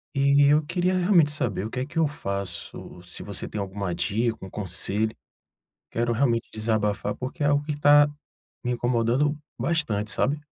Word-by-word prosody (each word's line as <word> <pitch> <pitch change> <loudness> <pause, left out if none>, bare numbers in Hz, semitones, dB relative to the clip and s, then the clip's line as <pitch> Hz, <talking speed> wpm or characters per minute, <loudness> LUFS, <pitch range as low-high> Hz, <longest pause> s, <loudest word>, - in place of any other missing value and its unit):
E 140 +1 +4
eu 150 +1 +4
queria 180 +3 0
realmente 175 -5 +4
saber 110 -10 -2
o - - -4
que 125 - -3
é - - -1
que 165 +3 -3
eu 160 - +4
faço, 100 -8 -6
se 85 - -9
você 100 0 -5
tem 105 - -4
alguma 100 -2 -3
dica, 105 +7 0
um - - -9
conselho. 105 +3 -2 0.8
Quero 120 +1 0
realmente 115 -1 +1
desabafar, 105 -2 -1
porque 130 +4 -5
é - - +3
algo 145 0 +2
que 150 - -2
está 145 0 +6 0.6
me 125 - -1
incomodando 120 +4 +1 0.2
bastante, 115 -11 0
sabe. 145 +3 0
120 Hz, 170 wpm, -25 LUFS, 105-145 Hz, 0.8 s, está